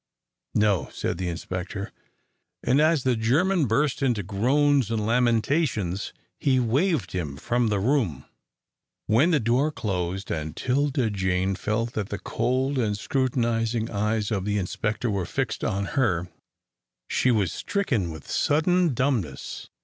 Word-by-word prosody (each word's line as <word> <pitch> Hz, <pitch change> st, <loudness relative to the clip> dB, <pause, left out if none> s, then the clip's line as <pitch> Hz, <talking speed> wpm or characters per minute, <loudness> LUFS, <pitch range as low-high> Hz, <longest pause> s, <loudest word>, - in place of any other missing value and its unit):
"No," 100 Hz, -8 st, +2 dB
said -, -, -3 dB
the 90 Hz, -, -2 dB
inspector, 90 Hz, +4 st, -5 dB, 0.7 s
and 135 Hz, +4 st, +3 dB
as 155 Hz, -3 st, +3 dB
the 130 Hz, -2 st, +2 dB
German 150 Hz, +9 st, +2 dB
burst 140 Hz, +6 st, +1 dB
out 135 Hz, -, +3 dB
into 115 Hz, -5 st, 0 dB
groans 130 Hz, +6 st, +2 dB
and 110 Hz, -2 st, -1 dB
lamentations, 115 Hz, -, +1 dB, 0.3 s
he 130 Hz, -2 st, +3 dB
waved 130 Hz, -, +1 dB
him 75 Hz, -7 st, -3 dB
from 120 Hz, -, 0 dB
the 105 Hz, -2 st, +1 dB
room. 105 Hz, -, 0 dB, 0.8 s
When 120 Hz, +11 st, +4 dB
the 160 Hz, -4 st, +3 dB
door 125 Hz, +6 st, +2 dB
closed, 95 Hz, -, -3 dB
and 80 Hz, 0 st, -3 dB
'Tilda 130 Hz, -3 st, +1 dB
Jane 95 Hz, -1 st, 0 dB
felt 110 Hz, +5 st, -2 dB
that 105 Hz, -3 st, -3 dB
the 100 Hz, -, -3 dB
cold 130 Hz, +6 st, -1 dB
and 105 Hz, -4 st, 0 dB
scrutinising 115 Hz, -2 st, 0 dB
eyes 105 Hz, +1 st, 0 dB
of 100 Hz, -3 st, 0 dB
the 105 Hz, +1 st, 0 dB
inspector 105 Hz, +4 st, -2 dB
were 95 Hz, -3 st, -1 dB
fixed -, -, -2 dB
on 100 Hz, +1 st, 0 dB
her, 95 Hz, -10 st, +1 dB, 0.8 s
she 130 Hz, -, +1 dB
was 105 Hz, -8 st, +2 dB
stricken 130 Hz, -, -1 dB
with 80 Hz, -3 st, -9 dB
sudden 165 Hz, 0 st, +2 dB
dumbness. 120 Hz, -, -2 dB
115 Hz, 140 wpm, -25 LUFS, 100-130 Hz, 0.8 s, When